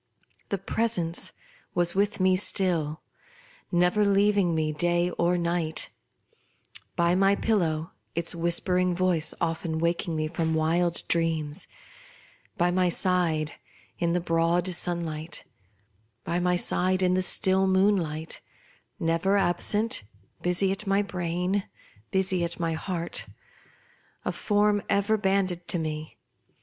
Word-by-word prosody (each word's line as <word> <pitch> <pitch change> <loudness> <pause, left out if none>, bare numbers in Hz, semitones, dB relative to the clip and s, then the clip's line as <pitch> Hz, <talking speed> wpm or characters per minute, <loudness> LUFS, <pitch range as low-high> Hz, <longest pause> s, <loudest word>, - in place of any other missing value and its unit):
The 200 - 0
Presence 195 -4 -1 0.4
was 175 -1 +2
with 205 +1 0
me 185 0 +4
still, 175 -5 +1 0.7
never 180 +4 +3
leaving 200 -3 +3
me 155 -1 0
day 175 +3 +1
or 175 +1 +1
night: 170 -2 -1 1.0
by 170 0 +2
my 195 +2 +4
pillow, 165 -8 0 0.2
its 170 0 0
whispering 180 +1 +1
voice 180 -3 +2
often 165 -1 -2
waking 170 0 -1
me 155 0 -1
from 160 0 -1
wild 170 +2 +1
dreams; 165 0 0 0.9
by 175 +1 +2
my 180 0 +2
side 170 -4 +1 0.5
in 170 -1 +1
the 180 - +2
broad 165 +1 +1
sunlight; 170 -2 -2 0.8
by 170 - -1
my 180 0 +2
side 185 +1 +2
in 180 0 +3
the 185 - +2
still 190 0 +2
moonlight; 185 -5 +1 0.6
never 165 +5 +1
absent, 205 +4 +1 0.4
busy 180 +2 +2
at 195 +1 -4
my 195 +1 +2
brain, 180 +1 -2 0.4
busy 190 -2 +1
at 170 0 -3
my 165 -1 0
heart 170 +1 -4 0.5
— - - -34
a - - 0
form 205 -1 +1
ever 200 +2 +2
banded 190 -4 0
to - - +1
me. 155 -1 -5
175 Hz, 125 wpm, -27 LUFS, 165-190 Hz, 1.0 s, me